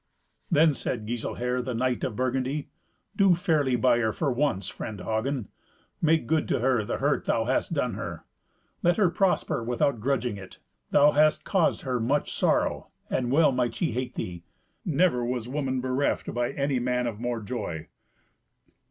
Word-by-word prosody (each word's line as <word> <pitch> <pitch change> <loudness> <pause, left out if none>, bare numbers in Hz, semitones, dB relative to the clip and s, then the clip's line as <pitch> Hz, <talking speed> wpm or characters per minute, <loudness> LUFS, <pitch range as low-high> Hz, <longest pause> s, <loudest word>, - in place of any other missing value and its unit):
Then 160 -3 +5
said 120 -4 -4
Giselher, 120 +2 -2
the 125 -1 -4
knight 125 +1 0
of 115 - -2
Burgundy, 130 +3 -1 0.5
"Do 195 -3 +5
fairly 155 -7 +1
by 120 0 +3
her 110 -2 +1
for 140 +6 -1
once, 125 -6 0
friend 105 -2 -6
Hagen. 115 +3 -2 0.5
Make 160 -3 +3
good 155 +4 +1
to - - +1
her 125 -2 +2
the - - -3
hurt - - 0
thou - - +1
hast - - 0
done - - 0
her. - - -6 0.6
Let 175 0 +3
her 195 -5 +3
prosper 185 - +1
without 120 +1 0
grudging 125 -2 -1
it. 95 -1 -11 0.3
Thou 145 +1 +6
hast 150 +1 +3
caused 190 -5 +1
her 130 -3 -1
much 135 +6 0
sorrow, - - +1 0.2
and 125 -2 0
well 155 +1 +5
might 125 -3 0
she 165 - 0
hate 125 +2 -3
thee. 85 -2 -5 0.4
Never 165 -6 +2
was 120 -1 -2
woman 130 -1 -2
bereft 130 +2 -1
by 120 0 0
any 140 -2 0
man 125 0 0
of 110 -3 -4
more 120 0 -2
joy." 100 -8 -5
125 Hz, 170 wpm, -27 LUFS, 120-145 Hz, 0.6 s, Thou